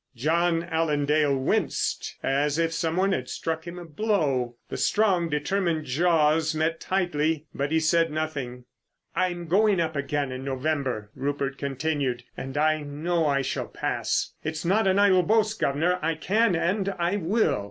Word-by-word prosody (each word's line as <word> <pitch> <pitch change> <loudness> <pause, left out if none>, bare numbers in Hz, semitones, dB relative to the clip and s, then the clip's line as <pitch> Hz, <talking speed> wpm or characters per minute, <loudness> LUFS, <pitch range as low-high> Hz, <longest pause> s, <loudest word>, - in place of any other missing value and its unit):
John 165 +6 +1
Allen 160 -3 0
Dale 150 -1 +2
winced 130 - -1
as 145 +2 +1
if 165 -1 +1
some 165 0 -1
one 190 +2 +2
had 130 -9 -2
struck 160 0 -3
him 170 +1 -7
a 175 - -8
blow. 150 - 0
The - - -4
strong, 190 -6 +2
determined 160 +1 0
jaws 155 +1 +2
met 160 +1 0
tightly, 160 -5 0
but 140 +2 -2
he 160 - +3
said 165 +1 +3
nothing. 140 -6 -4 0.5
"I'm 175 -2 -1
going 200 +2 +3
up 160 -2 -1
again 140 -1 -1
in 130 +1 -5
November," 135 -5 -2
Rupert 140 0 -3
continued. 140 -3 -2
"And 135 +2 -6
I 155 +1 +2
know 155 +3 -1
I 140 -1 +1
shall - - -3
pass. - - -2
It's 160 +1 -4
not 195 +4 +3
an 190 0 +3
idle 200 -2 +5
boast, 215 +3 +1
guv'nor. 165 +6 +1
I 165 +1 +1
can, 200 +5 +2
and 190 +4 0
I 175 +3 0
will." 185 - +1
160 Hz, 165 wpm, -26 LUFS, 145-175 Hz, 0.5 s, idle